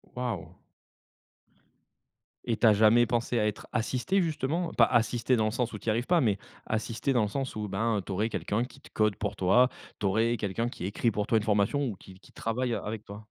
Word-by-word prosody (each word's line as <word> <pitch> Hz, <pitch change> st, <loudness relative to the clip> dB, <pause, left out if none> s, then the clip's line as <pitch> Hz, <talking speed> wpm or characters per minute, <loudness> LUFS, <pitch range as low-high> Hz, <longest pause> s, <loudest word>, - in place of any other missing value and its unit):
Waouh! 125 Hz, -1 st, -4 dB, 1.9 s
Et 115 Hz, -2 st, 0 dB
tu 115 Hz, -, +4 dB
as 110 Hz, -, +7 dB
jamais 110 Hz, +3 st, +5 dB
pensé 120 Hz, 0 st, 0 dB
à 105 Hz, -, +2 dB
être 105 Hz, -, -5 dB
assistée 130 Hz, -, 0 dB
justement, 160 Hz, +1 st, -1 dB
pas -, -, +5 dB
assistée 120 Hz, +1 st, +2 dB
dans 110 Hz, -, +2 dB
le 110 Hz, -, 0 dB
sens 120 Hz, 0 st, -1 dB
où 105 Hz, -, -5 dB
tu -, -, -15 dB
y -, -, +4 dB
arrives 115 Hz, +3 st, 0 dB
pas, 175 Hz, -1 st, +4 dB
mais 105 Hz, -5 st, +2 dB, 0.3 s
assistée 115 Hz, +4 st, -1 dB
dans 120 Hz, -, +3 dB
le 105 Hz, -, -1 dB
sens 135 Hz, +1 st, -3 dB
où, 105 Hz, -1 st, -3 dB
ben, 105 Hz, +1 st, 0 dB
tu -, -, -6 dB
aurais 105 Hz, +4 st, 0 dB
quelqu'un 110 Hz, +2 st, -1 dB
qui 135 Hz, +1 st, -16 dB
te -, -, -16 dB
code 105 Hz, -2 st, +1 dB
pour 105 Hz, -1 st, -3 dB
toi. 120 Hz, +8 st, +4 dB, 0.3 s
Tu 105 Hz, -, -2 dB
aurais 110 Hz, +4 st, +2 dB
quelqu'un 105 Hz, +4 st, -2 dB
qui 90 Hz, -, -7 dB
écrit, 110 Hz, +4 st, 0 dB
pour 105 Hz, 0 st, -1 dB
toi, 115 Hz, -, +3 dB
une 105 Hz, -, 0 dB
formation, 105 Hz, +6 st, +1 dB
ou 105 Hz, -, -4 dB
qui 95 Hz, +1 st, -15 dB
qui -, -, -19 dB
travaille 120 Hz, +2 st, -2 dB
a -, -, -1 dB
avec 105 Hz, 0 st, -6 dB
toi? 105 Hz, +2 st, -10 dB
115 Hz, 230 wpm, -29 LUFS, 105-125 Hz, 1.9 s, as